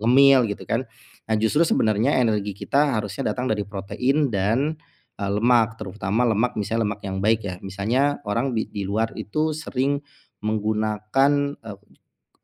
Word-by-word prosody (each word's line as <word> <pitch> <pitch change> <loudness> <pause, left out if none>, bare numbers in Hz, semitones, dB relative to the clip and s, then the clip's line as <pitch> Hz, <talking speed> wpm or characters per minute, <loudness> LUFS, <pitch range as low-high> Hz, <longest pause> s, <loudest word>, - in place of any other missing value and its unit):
ngemil 130 +2 +6
gitu - - -9
kan. 120 +3 0 0.4
Nah, 110 - +2
justru 110 +9 +3
sebenarnya 115 +1 +2
energi 105 -3 0
kita 140 0 +1
harusnya 105 0 -3
datang 125 0 -3
dari 105 -2 0
protein 125 +9 0
dan, 115 +11 +1 0.4
eee, 100 -1 -2
lemak 115 0 +3
terutama 105 +4 -1
lemak 110 +3 +1
misalnya 115 +2 0
lemak 105 0 -5
yang 95 0 -3
baik 110 0 +3
ya, 90 - -4
misalnya 115 +10 0
orang 120 +5 0
di 110 - -1
di 100 -2 -4
luar 110 +3 -1
itu 155 +8 -1
sering 140 -2 -1 0.5
menggunakan, 110 +7 +1
eee, 110 -3 -9 0.5
koco - - -45
110 Hz, 155 wpm, -23 LUFS, 105-135 Hz, 0.5 s, ngemil